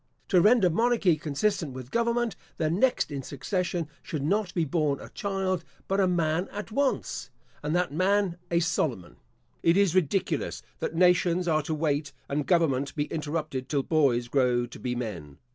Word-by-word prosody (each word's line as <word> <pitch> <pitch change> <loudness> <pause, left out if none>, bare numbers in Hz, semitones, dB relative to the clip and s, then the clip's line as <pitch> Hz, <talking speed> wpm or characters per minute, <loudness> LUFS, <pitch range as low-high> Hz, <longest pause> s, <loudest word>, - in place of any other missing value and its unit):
To 185 -4 +5
render 215 0 +5
monarchy 220 -1 +3
consistent 155 +1 -1
with 130 0 -8
government, 235 -1 +1 0.2
the 155 -1 0
next 225 - +2
in 140 -1 -3
succession 170 +5 -2
should 155 -6 -4
not 195 +4 +1
be 170 -3 +2
born 150 -2 0
a - - -10
child, 190 -3 -2 0.2
but 195 +1 +1
a 190 - +4
man 175 0 0
at 205 +2 -6
once, 275 +3 -1 0.3
and 150 +3 -1
that 175 -5 0
man 190 +1 +2
a 170 0 +2
Solomon. 155 - -1 0.4
It 170 +2 +4
is 200 -4 +4
ridiculous 185 +1 0 0.2
that - - -3
nations 180 0 +3
are 155 -2 +3
to 155 +1 -3
wait 145 -1 -1
and 145 0 -2
government 140 -6 +2
be 145 - +1
interrupted 150 -4 -3
till 140 -3 +1
boys 130 -7 +2
grow 125 -2 +2
to 120 - -11
be 125 -1 -2
men. 85 - -5
165 Hz, 170 wpm, -27 LUFS, 140-190 Hz, 0.4 s, To